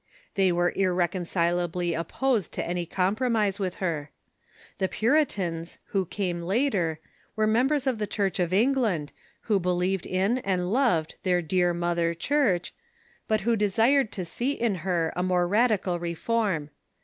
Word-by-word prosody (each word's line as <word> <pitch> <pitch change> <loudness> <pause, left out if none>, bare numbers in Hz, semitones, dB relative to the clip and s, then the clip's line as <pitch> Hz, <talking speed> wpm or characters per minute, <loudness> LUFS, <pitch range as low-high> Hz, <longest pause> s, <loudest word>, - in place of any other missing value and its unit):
They 190 -2 +3
were 175 0 +2
irrecon 180 -1 0
cilably 175 0 0
opposed 215 +5 -1
to - - -3
any 175 0 -2
compromise 210 +2 0
with 185 -2 -2
her. 160 -6 -3 0.7
The 190 - +2
Puritans, 195 - 0
who 190 -3 0
came 180 -3 -2
later, 185 - 0 0.4
were 215 -1 +2
members 260 +6 +2
of 255 -5 0
the 210 - -1
Church 195 -3 -1
of 175 -1 0
England, 210 - +1 0.3
who 210 -4 +1
believed 180 +1 0
in 195 +7 +1
and 185 -5 -1
loved 230 - +1
"their 180 -1 +1
dear 175 +2 +2
mother 170 -1 0
Church," 200 - +1 0.5
but 215 -1 +1
who 230 +3 +2
desired 225 +4 +2
to 185 - -4
see 245 +11 -1
in 235 -6 0
her 170 -3 0
a 180 - -1
more 180 -1 +1
radical 205 -4 +2
reform. 170 -2 -1
185 Hz, 150 wpm, -26 LUFS, 175-220 Hz, 0.7 s, They